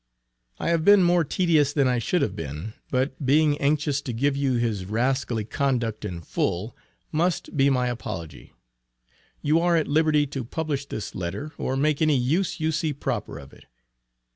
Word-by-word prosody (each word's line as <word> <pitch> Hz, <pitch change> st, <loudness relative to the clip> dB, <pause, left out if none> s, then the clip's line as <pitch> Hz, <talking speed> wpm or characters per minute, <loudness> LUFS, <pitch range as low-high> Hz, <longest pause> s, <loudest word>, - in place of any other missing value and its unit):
I -, -, 0 dB
have 165 Hz, -2 st, +1 dB
been 205 Hz, +1 st, +7 dB
more 175 Hz, -1 st, +4 dB
tedious 155 Hz, -3 st, +2 dB
than 140 Hz, -3 st, +3 dB
I 125 Hz, -1 st, +1 dB
should 175 Hz, +10 st, +1 dB
have 100 Hz, -, -2 dB
been, 80 Hz, +4 st, -6 dB, 0.2 s
but 130 Hz, +2 st, -1 dB
being 145 Hz, +2 st, +4 dB
anxious 145 Hz, 0 st, +1 dB
to 135 Hz, -, -5 dB
give 135 Hz, +5 st, +1 dB
you 140 Hz, -2 st, +1 dB
his 115 Hz, -6 st, -1 dB
rascally 120 Hz, +1 st, -1 dB
conduct 120 Hz, -4 st, -1 dB
in 90 Hz, -4 st, -5 dB
full, 90 Hz, +6 st, -2 dB, 0.4 s
must 170 Hz, +2 st, -1 dB
be 140 Hz, 0 st, +4 dB
my 125 Hz, -2 st, +2 dB
apology. 85 Hz, -, -6 dB, 0.9 s
You 155 Hz, +3 st, +3 dB
are 170 Hz, 0 st, +3 dB
at 160 Hz, -, 0 dB
liberty 150 Hz, 0 st, +3 dB
to 135 Hz, -2 st, -5 dB
publish 145 Hz, +2 st, -3 dB
this 110 Hz, -, -5 dB
letter, 95 Hz, -, -4 dB
or 130 Hz, -, -1 dB
make 150 Hz, +2 st, +1 dB
any 155 Hz, -3 st, +4 dB
use 155 Hz, +12 st, 0 dB
you 160 Hz, 0 st, +1 dB
see 155 Hz, -1 st, -1 dB
proper 125 Hz, -, -4 dB
of 70 Hz, 0 st, -12 dB
it. -, -, -17 dB
140 Hz, 175 wpm, -25 LUFS, 115-155 Hz, 0.9 s, been